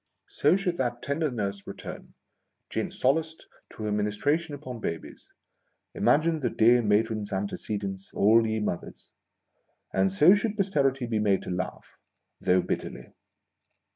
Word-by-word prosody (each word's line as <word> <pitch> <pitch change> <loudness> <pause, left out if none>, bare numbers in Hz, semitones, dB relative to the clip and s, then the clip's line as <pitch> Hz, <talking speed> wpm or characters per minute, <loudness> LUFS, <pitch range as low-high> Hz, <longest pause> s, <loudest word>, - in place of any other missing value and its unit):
So 150 +5 +3
should 185 -3 -1
that 120 -2 -2
tender 150 +3 0
nurse 100 -5 -4
return, - - -9 0.6
gin - - -1
solaced, 160 +5 0 0.2
to 110 - -9
her 105 - -1
mi 105 0 +1
nistration 145 +9 0
upon 130 -4 -8
babies, 85 -6 -6 0.6
(imagine 160 +1 +2
the 135 - 0
dear 120 +2 +4
matron's 105 -1 +1
antecedents, 100 0 -4
all 115 +2 +5
ye 110 0 -1
mothers 95 -5 -5 0.4
!) - - -45
and 95 0 +2
so 150 - +7
should 210 +1 0
Posterity 140 - +1
be 115 -2 -1
made 100 -2 +2
to - - -5
laugh, 90 +1 -5 0.4
though 90 0 +3
bitterly - - -5
115 Hz, 140 wpm, -27 LUFS, 100-150 Hz, 0.6 s, so